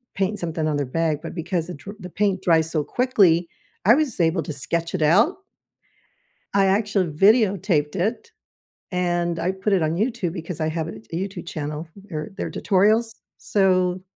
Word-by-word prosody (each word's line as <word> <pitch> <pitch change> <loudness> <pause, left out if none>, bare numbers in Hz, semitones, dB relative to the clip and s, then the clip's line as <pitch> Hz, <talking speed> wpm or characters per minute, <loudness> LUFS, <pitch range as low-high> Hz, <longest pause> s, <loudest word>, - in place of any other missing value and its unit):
paint 195 +2 -1
something 165 -2 -2
on 150 - 0
their 145 - -1
bag", 155 +2 0
but 165 - -7
because 170 -1 -2
the 180 - -6
dr 195 +8 -10
the 180 -2 -8
paint 195 0 0
dries 160 -2 +3
so 155 -3 0
quickly, 190 - +3 0.4
I 220 - +8
was 290 -8 -1
able 165 0 +2
to 150 - -5
sketch 165 +5 -2
it 180 - -2
out 205 - +4 1.2
I 200 -1 +4
actually 200 -1 +1
videotaped 195 -3 +3
it, 225 - -2 0.6
and 175 -1 0
I 175 +2 0
put 190 +2 -2
it 190 -3 +3
on 155 +1 0
YouTube- 215 -4 -1
because 165 -1 -6
I 155 - +1
have 160 0 -2
a 110 - -8
t 110 - -26 0.2
YouTube 190 - -9
channel, 155 0 -5 0.2
or 155 -2 -4
they're - - -3
tutorials- 215 +4 +2 0.3
so, 185 -2 +1
180 Hz, 180 wpm, -23 LUFS, 160-200 Hz, 1.2 s, I